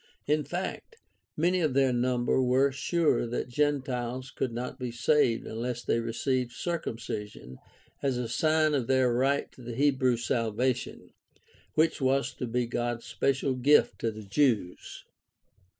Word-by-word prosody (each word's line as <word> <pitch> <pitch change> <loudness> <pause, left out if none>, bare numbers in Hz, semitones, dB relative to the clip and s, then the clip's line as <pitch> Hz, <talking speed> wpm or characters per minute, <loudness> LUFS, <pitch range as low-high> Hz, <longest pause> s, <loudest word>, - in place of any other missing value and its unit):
In 150 +1 +1
fact, 180 - -5 0.4
many 175 +3 +2
of 150 -5 0
their 135 -2 +3
number 125 +1 +1
were 130 +2 +3
sure 155 -1 +1
that 120 +1 -3
Gentiles 130 -2 -1
could 130 -1 -2
not 125 +3 -5
be 125 -1 -3
saved 120 0 +2
unless 120 +2 -4
they 115 - +1
received 120 +2 -1
circumcision 110 - -5 0.4
as 135 -3 0
a 125 -1 -2
sign 155 +5 +2
of 130 -5 0
their 130 -2 +3
right 135 +4 +1
to - - -16
the 120 -1 -6
Hebrew 130 -2 +2
salvation, 120 +1 -1 0.6
which 160 -1 +2
was 135 -1 +1
to 125 - -2
be 120 +1 0
God's 120 0 -3
special 135 0 0
gift 125 -1 +3
to 115 - 0
the 110 -1 -8
Jews. 105 -5 0
125 Hz, 145 wpm, -28 LUFS, 120-140 Hz, 0.6 s, their